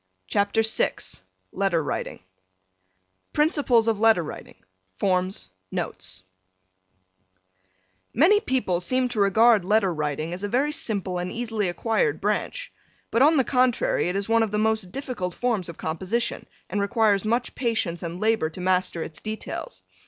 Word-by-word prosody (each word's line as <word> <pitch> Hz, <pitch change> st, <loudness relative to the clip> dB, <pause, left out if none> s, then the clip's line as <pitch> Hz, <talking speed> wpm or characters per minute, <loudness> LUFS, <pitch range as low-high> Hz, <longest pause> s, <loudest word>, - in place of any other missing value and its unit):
'" 95 Hz, 0 st, -49 dB
CHAPTER 205 Hz, +2 st, +2 dB
VI 220 Hz, -, +2 dB, 0.6 s
LETTER 185 Hz, -5 st, 0 dB
WRITING 145 Hz, -, -4 dB, 1.1 s
Principles 290 Hz, -7 st, +3 dB
of 220 Hz, -3 st, +1 dB
Letter 220 Hz, -5 st, +4 dB
Writing -, -, -9 dB, 0.4 s
Forms 185 Hz, -, -1 dB, 0.2 s
Notes 95 Hz, 0 st, -5 dB, 1.9 s
Many 350 Hz, -, +5 dB
people 250 Hz, -, 0 dB
seem 255 Hz, +6 st, +1 dB
to 235 Hz, -3 st, -3 dB
regard 215 Hz, +1 st, +5 dB
letter 200 Hz, -1 st, +2 dB
writing 155 Hz, +1 st, -3 dB
as 185 Hz, +3 st, -5 dB
a -, -, 0 dB
very 265 Hz, +8 st, +1 dB
simple 195 Hz, -10 st, -2 dB
and 180 Hz, +1 st, -3 dB
easily 225 Hz, -5 st, -2 dB
acquired 230 Hz, -, 0 dB
branch, -, -, -2 dB, 0.4 s
but 230 Hz, -, +2 dB
on 305 Hz, +4 st, +6 dB
the 265 Hz, -, +4 dB
contrary 250 Hz, -7 st, +1 dB
it 180 Hz, -, -3 dB
is 200 Hz, 0 st, -2 dB
one 230 Hz, 0 st, +3 dB
of 225 Hz, -, +1 dB
the 210 Hz, -, -2 dB
most 215 Hz, -3 st, 0 dB
difficult 240 Hz, -9 st, -4 dB
forms 225 Hz, -8 st, -1 dB
of 170 Hz, -, -9 dB
composition 190 Hz, +9 st, -2 dB, 0.2 s
and 205 Hz, +2 st, -2 dB
requires 205 Hz, -2 st, +2 dB
much 235 Hz, +3 st, -1 dB
patience 225 Hz, -9 st, -1 dB
and 170 Hz, +1 st, -5 dB
labor 220 Hz, -7 st, +1 dB
to 160 Hz, -, -10 dB
master 180 Hz, -2 st, 0 dB
its 160 Hz, -, -7 dB
details. 220 Hz, -, -6 dB
210 Hz, 150 wpm, -25 LUFS, 180-235 Hz, 1.9 s, on